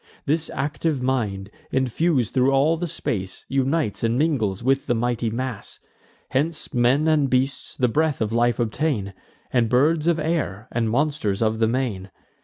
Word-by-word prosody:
This 155 Hz, +2 st, 0 dB
active 145 Hz, +1 st, -1 dB
mind, 105 Hz, -7 st, -1 dB, 0.2 s
infus'd 130 Hz, 0 st, +1 dB
thro' 130 Hz, 0 st, +3 dB
all 140 Hz, +4 st, +3 dB
the 175 Hz, +2 st, -3 dB
space, 95 Hz, -, -4 dB
Unites 135 Hz, -3 st, 0 dB
and 115 Hz, +1 st, +1 dB
mingles 120 Hz, -, 0 dB
with 135 Hz, +2 st, +1 dB
the 120 Hz, -, +2 dB
mighty 120 Hz, 0 st, 0 dB
mass. 120 Hz, -1 st, -5 dB, 0.5 s
Hence 155 Hz, +4 st, -1 dB
men 130 Hz, +5 st, +3 dB
and 150 Hz, -3 st, +3 dB
beasts 130 Hz, +2 st, -1 dB
the 125 Hz, -, +3 dB
breath 150 Hz, +4 st, +1 dB
of 110 Hz, 0 st, -1 dB
life 120 Hz, +1 st, +2 dB
obtain, 115 Hz, -3 st, -1 dB, 0.4 s
And 120 Hz, -3 st, +2 dB
birds 150 Hz, +6 st, +3 dB
of 170 Hz, -1 st, +3 dB
air, 150 Hz, -, -2 dB
and 115 Hz, -2 st, 0 dB
monsters 120 Hz, -6 st, 0 dB
of 110 Hz, 0 st, 0 dB
the 110 Hz, -, +3 dB
main. 110 Hz, -6 st, -2 dB
130 Hz, 160 wpm, -23 LUFS, 115-150 Hz, 0.5 s, thro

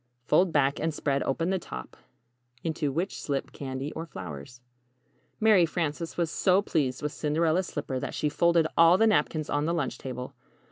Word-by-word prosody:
Fold 180 Hz, +7 st, +3 dB
back 140 Hz, -2 st, +2 dB
and 160 Hz, +1 st, 0 dB
spread 140 Hz, -2 st, 0 dB
open 165 Hz, +6 st, 0 dB
the 190 Hz, -, 0 dB
top, 65 Hz, -, -8 dB, 0.7 s
into 160 Hz, -3 st, -1 dB
which 170 Hz, +8 st, -3 dB
slip 140 Hz, -2 st, -3 dB
candy 135 Hz, +1 st, -5 dB
or 165 Hz, +1 st, -6 dB
flowers] 90 Hz, -, -8 dB, 0.8 s
Mary 215 Hz, -5 st, +5 dB
Frances 165 Hz, 0 st, -2 dB
was 170 Hz, -2 st, 0 dB
so 185 Hz, +2 st, +3 dB
pleased 145 Hz, -9 st, -1 dB
with 150 Hz, -, -1 dB
the -, -, -12 dB
Cinderella's 160 Hz, +4 st, +1 dB
slipper 130 Hz, -1 st, -3 dB
that -, -, -5 dB
she 150 Hz, -, 0 dB
folded 170 Hz, +2 st, +3 dB
all 165 Hz, +2 st, +7 dB
the 225 Hz, -, +4 dB
napkins 155 Hz, -7 st, +1 dB
on 145 Hz, +1 st, 0 dB
the 170 Hz, +2 st, 0 dB
lunch 145 Hz, -6 st, -2 dB
table. 125 Hz, -1 st, -6 dB
155 Hz, 180 wpm, -28 LUFS, 135-170 Hz, 0.8 s, all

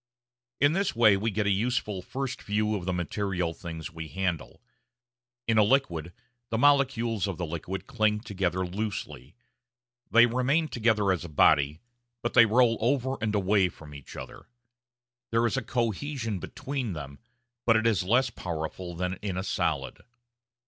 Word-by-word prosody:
In 145 Hz, +2 st, +4 dB
this 195 Hz, -4 st, 0 dB
way 110 Hz, -3 st, +6 dB
we 105 Hz, +4 st, 0 dB
get 105 Hz, 0 st, -1 dB
a 100 Hz, -, +3 dB
useful 105 Hz, -2 st, 0 dB
first 135 Hz, +6 st, -4 dB
view 105 Hz, +1 st, 0 dB
of 95 Hz, -4 st, -4 dB
the 95 Hz, -, 0 dB
material 90 Hz, -1 st, -2 dB
things 80 Hz, -2 st, -7 dB
we 80 Hz, -1 st, -7 dB
handle. 90 Hz, -2 st, -3 dB, 0.9 s
In 115 Hz, -1 st, +4 dB
a -, -, +7 dB
liquid 90 Hz, -, +1 dB, 0.4 s
the 115 Hz, -, -1 dB
molecules 120 Hz, -6 st, +3 dB
of 95 Hz, -4 st, -4 dB
the 90 Hz, -, -2 dB
liquid 85 Hz, +4 st, -5 dB
cling 110 Hz, -5 st, +1 dB
together 95 Hz, -4 st, -1 dB
loosely. 105 Hz, +3 st, -5 dB, 0.7 s
They 120 Hz, +1 st, +7 dB
remain 130 Hz, +7 st, +1 dB
together 110 Hz, -4 st, +2 dB
as 90 Hz, -2 st, -1 dB
a 85 Hz, -, -7 dB
body, 75 Hz, +1 st, +3 dB, 0.4 s
but 120 Hz, -, -1 dB
they 120 Hz, -2 st, +7 dB
roll 115 Hz, +1 st, +3 dB
over 130 Hz, +2 st, +1 dB
and 110 Hz, -1 st, 0 dB
away 100 Hz, -1 st, +3 dB
from 75 Hz, -3 st, -13 dB
each 70 Hz, -2 st, -11 dB
other. -, -, -9 dB, 0.8 s
There 115 Hz, +1 st, +2 dB
is 120 Hz, -, +1 dB
"cohesion" 115 Hz, -2 st, -2 dB
between 130 Hz, +1 st, -4 dB
them, 70 Hz, -3 st, -8 dB, 0.5 s
but 115 Hz, -, +6 dB
it 110 Hz, 0 st, +2 dB
is 110 Hz, -6 st, +3 dB
less 120 Hz, +7 st, +2 dB
powerful 85 Hz, -1 st, -5 dB
than 90 Hz, +1 st, -3 dB
in 95 Hz, -3 st, -3 dB
a 95 Hz, -, -2 dB
solid. 95 Hz, -, -2 dB
105 Hz, 160 wpm, -28 LUFS, 90-120 Hz, 0.9 s, a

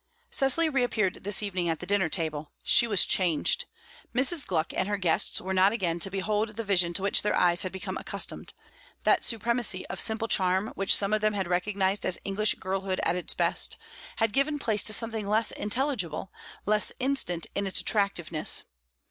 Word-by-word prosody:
Cecily 275 Hz, +5 st, +3 dB
reappeared 245 Hz, -, -1 dB
this 205 Hz, +1 st, +2 dB
evening 180 Hz, -4 st, -2 dB
at 165 Hz, -, -1 dB
the -, -, -7 dB
dinner 195 Hz, -3 st, +1 dB
table. 155 Hz, -3 st, -3 dB
She 235 Hz, -, +4 dB
was 205 Hz, -5 st, +4 dB
changed; 175 Hz, -5 st, +1 dB, 0.5 s
Mrs. 280 Hz, +5 st, +3 dB
Gluck 165 Hz, -3 st, -1 dB
and -, -, -1 dB
her 205 Hz, 0 st, -1 dB
guests 180 Hz, -4 st, 0 dB
were 190 Hz, +1 st, -4 dB
not 190 Hz, +1 st, +4 dB
again 175 Hz, -6 st, -2 dB
to 180 Hz, -, +1 dB
behold 210 Hz, +3 st, -1 dB
the 230 Hz, -, -4 dB
vision 185 Hz, -4 st, +2 dB
to 190 Hz, -, -1 dB
which 200 Hz, -, +2 dB
their 210 Hz, -, 0 dB
eyes 175 Hz, -1 st, +3 dB
had 185 Hz, -, -3 dB
become 190 Hz, 0 st, -5 dB
accustomed; -, -, -4 dB, 0.5 s
that -, -, +3 dB
supremacy 235 Hz, -3 st, +1 dB
of 190 Hz, -, -5 dB
simple 220 Hz, +1 st, 0 dB
charm 190 Hz, +1 st, +1 dB
which 195 Hz, 0 st, +3 dB
some 200 Hz, +1 st, +2 dB
of 215 Hz, -, +1 dB
them 215 Hz, 0 st, +1 dB
had 195 Hz, -3 st, -2 dB
recognized 190 Hz, +2 st, -1 dB
as 185 Hz, -, -1 dB
English 205 Hz, +2 st, +1 dB
girlhood 190 Hz, 0 st, -3 dB
at -, -, +1 dB
its 180 Hz, -, -2 dB
best, -, -, 0 dB, 0.4 s
had 225 Hz, -2 st, 0 dB
given 275 Hz, +3 st, +1 dB
place 220 Hz, -7 st, +1 dB
to 215 Hz, -, -2 dB
something 220 Hz, -1 st, -2 dB
less 215 Hz, +2 st, +3 dB
intelligible, 210 Hz, -, -3 dB, 0.3 s
less 210 Hz, +1 st, +2 dB
instant 255 Hz, -11 st, +1 dB
in 200 Hz, 0 st, -2 dB
its 190 Hz, -, 0 dB
attractiveness. 175 Hz, -7 st, 0 dB
200 Hz, 185 wpm, -27 LUFS, 185-220 Hz, 0.5 s, She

